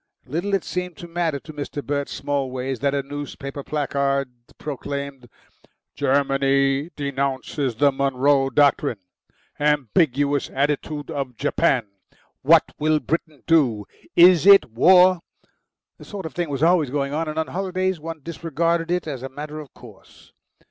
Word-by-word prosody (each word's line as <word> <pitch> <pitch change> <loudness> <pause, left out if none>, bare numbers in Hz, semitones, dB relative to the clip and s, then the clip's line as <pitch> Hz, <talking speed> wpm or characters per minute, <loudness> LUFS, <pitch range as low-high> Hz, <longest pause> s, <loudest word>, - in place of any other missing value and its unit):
Little 175 +9 -1
it 195 - -2
seemed 180 -2 -4
to 175 - -9
matter 165 -4 -1
to 155 - -11
Mr. 145 0 -6
Bert 140 0 -2
Smallways 135 -2 -3
that 140 +2 0
a 140 - -1
newspaper 140 0 -7
placard 140 -2 -1 0.3
proclaimed: 140 -3 -6 0.7
GERMANY 135 +1 +1
DENOUNCES 140 -2 -2
THE 140 +4 +3
MONROE 135 0 +2
DOCTRINE. 145 -3 +2 0.6
AMBIGUOUS 145 - +1
ATTITUDE 145 +1 -2
OF 135 -4 -4
JAPAN. 140 -4 +1 0.6
WHAT - - +6 0.2
WILL 155 0 +2
BRITAIN 155 -3 -3
DO? 125 -11 +2 0.3
IS 175 -1 +6
IT 200 - +7
WAR? 180 +8 +6 0.8
This - - -13
sort 200 -4 -7
of 160 - -6
thing 175 -3 -2
was 140 +1 -2
alvays 165 -4 +3
going 140 +1 -2
on, 160 +2 -1
and 155 0 -5
on 160 -3 -1
holidays 185 +1 -2
one 160 0 -7
disregarded 165 +1 -1
it 180 0 0
as 140 -5 -5
a 135 - -6
matter 150 +3 -7
of 150 -4 -10
course. - - -17
145 Hz, 140 wpm, -22 LUFS, 135-165 Hz, 0.8 s, IT